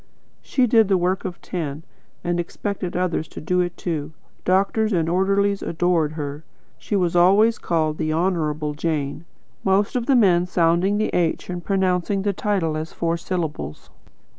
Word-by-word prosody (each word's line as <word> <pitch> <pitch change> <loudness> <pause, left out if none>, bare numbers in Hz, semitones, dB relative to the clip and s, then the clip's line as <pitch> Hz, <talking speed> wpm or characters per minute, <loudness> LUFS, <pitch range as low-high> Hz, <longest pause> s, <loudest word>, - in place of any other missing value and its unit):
She 255 - +1
did 225 -3 +4
the 195 -1 +3
work 180 +1 0
of 180 -2 -5
ten, 155 -4 -4 0.4
and 175 0 0
expected 180 +1 -3
others 175 -3 -1
to - - -9
do 180 +4 0
it 175 0 -3
too. 155 -3 -3 0.3
Doctors 200 +4 +2
and 165 -3 +1
orderlies 195 +3 +1
adored 165 -2 +1
her. 145 -1 -5 0.4
She 210 - -3
was 180 -3 +1
always 200 +6 +5
called 155 -2 0
'The 155 -1 0
Honourable 155 -3 0
Jane,' 150 0 -2 0.4
most 195 +3 +2
of 245 -2 -1
the 275 - +4
men 180 -6 +4
sounding 175 +3 +2
the 215 - 0
H 175 +1 0
and 175 -1 -5
pronouncing 190 0 0
the 200 -1 +1
title 185 -6 0
as 155 +1 -5
four 165 0 -1
syllables. 165 - -4
175 Hz, 165 wpm, -22 LUFS, 160-195 Hz, 0.4 s, always